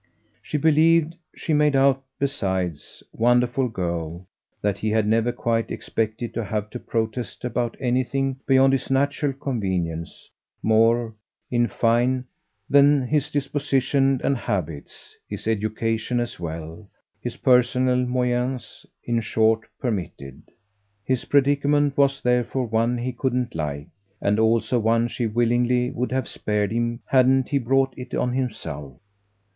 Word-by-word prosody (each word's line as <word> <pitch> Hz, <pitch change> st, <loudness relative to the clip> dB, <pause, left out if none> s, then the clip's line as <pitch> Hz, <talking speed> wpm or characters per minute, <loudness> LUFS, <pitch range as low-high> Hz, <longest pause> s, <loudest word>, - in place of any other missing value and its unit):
She -, -, -3 dB
believed 160 Hz, +1 st, +4 dB, 0.2 s
she 160 Hz, -, -2 dB
made 150 Hz, -1 st, +3 dB
out 135 Hz, 0 st, +3 dB
besides, 95 Hz, -, -3 dB
wonderful 120 Hz, +2 st, +2 dB
girl, 85 Hz, -3 st, -4 dB, 0.3 s
that 100 Hz, -2 st, -1 dB
he 110 Hz, -, -1 dB
had 110 Hz, 0 st, +2 dB
never 115 Hz, +2 st, +2 dB
quite 115 Hz, -1 st, -1 dB
expected 115 Hz, +1 st, -3 dB
to 115 Hz, -, -2 dB
have 105 Hz, 0 st, -3 dB
to 125 Hz, -, -6 dB
protest 115 Hz, +2 st, -3 dB
about 120 Hz, -1 st, -2 dB
anything 130 Hz, +1 st, 0 dB
beyond 135 Hz, 0 st, +5 dB
his 135 Hz, -, -1 dB
natural 140 Hz, +2 st, +1 dB
convenience 95 Hz, -, -4 dB, 0.3 s
more, 115 Hz, +1 st, +3 dB, 0.4 s
in 120 Hz, -1 st, +2 dB
fine, 120 Hz, +3 st, +1 dB, 0.4 s
than 140 Hz, -1 st, +5 dB
his 150 Hz, +3 st, 0 dB
disposition 135 Hz, -1 st, +1 dB
and 140 Hz, -, +2 dB
habits, 90 Hz, -, -5 dB
his -, -, -6 dB
education 110 Hz, +2 st, -1 dB
as 120 Hz, -5 st, -4 dB
well, 80 Hz, +3 st, -7 dB, 0.3 s
his -, -, -5 dB
personal 125 Hz, 0 st, +3 dB
moyens, 125 Hz, 0 st, -2 dB, 0.2 s
in 120 Hz, -1 st, 0 dB
short, 110 Hz, 0 st, +1 dB
permitted. 90 Hz, -, -4 dB, 0.6 s
His 130 Hz, -2 st, -1 dB
predicament 145 Hz, 0 st, +2 dB
was 140 Hz, -1 st, +2 dB
therefore 125 Hz, +1 st, +1 dB
one 115 Hz, +2 st, +1 dB
he 125 Hz, +1 st, -3 dB
couldn't 125 Hz, -1 st, -1 dB
like, 75 Hz, -1 st, -4 dB, 0.3 s
and 105 Hz, +2 st, +1 dB
also 115 Hz, +2 st, +2 dB
one 115 Hz, +1 st, +2 dB
she 120 Hz, 0 st, -2 dB
willingly 120 Hz, +2 st, +1 dB
would 125 Hz, +1 st, -3 dB
have 130 Hz, 0 st, -1 dB
spared 105 Hz, -1 st, -1 dB
him 120 Hz, +1 st, -1 dB
hadn't 130 Hz, 0 st, +3 dB
he 140 Hz, -, +1 dB
brought 135 Hz, +1 st, +1 dB
it 125 Hz, -1 st, -7 dB
on 125 Hz, -, 0 dB
himself. 80 Hz, -, -4 dB
120 Hz, 130 wpm, -23 LUFS, 110-135 Hz, 0.6 s, beyond